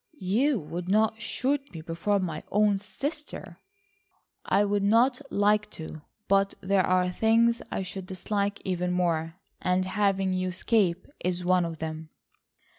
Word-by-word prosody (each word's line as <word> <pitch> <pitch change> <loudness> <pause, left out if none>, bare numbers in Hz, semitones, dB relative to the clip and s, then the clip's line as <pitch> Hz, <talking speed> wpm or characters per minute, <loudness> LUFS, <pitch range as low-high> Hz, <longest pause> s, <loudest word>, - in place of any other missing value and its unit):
You 235 +7 +1
would 175 +3 -6
not 220 +2 +2
shoot 275 +2 -1
me 160 - -6
before 170 +5 0
my 170 -5 -3
own 205 -1 +3
sister?" 290 +9 -6 0.8
"I 200 +2 +2
would 205 0 +1
not 235 +6 +3
like 210 +1 +2
to, 160 -1 -8 0.3
but 195 0 +2
there 190 0 +2
are 180 0 +2
things 230 +4 +3
I 195 - -2
should 190 0 -6
dislike 200 +2 -2
even 180 -1 -1
more, 165 -2 0 0.3
and 180 +1 +1
having 195 -1 +1
you 185 0 -1
escape 185 -1 +1
is 180 0 -1
one 180 -1 +3
of 165 -1 -5
them." 160 0 -5
190 Hz, 145 wpm, -27 LUFS, 180-210 Hz, 0.8 s, own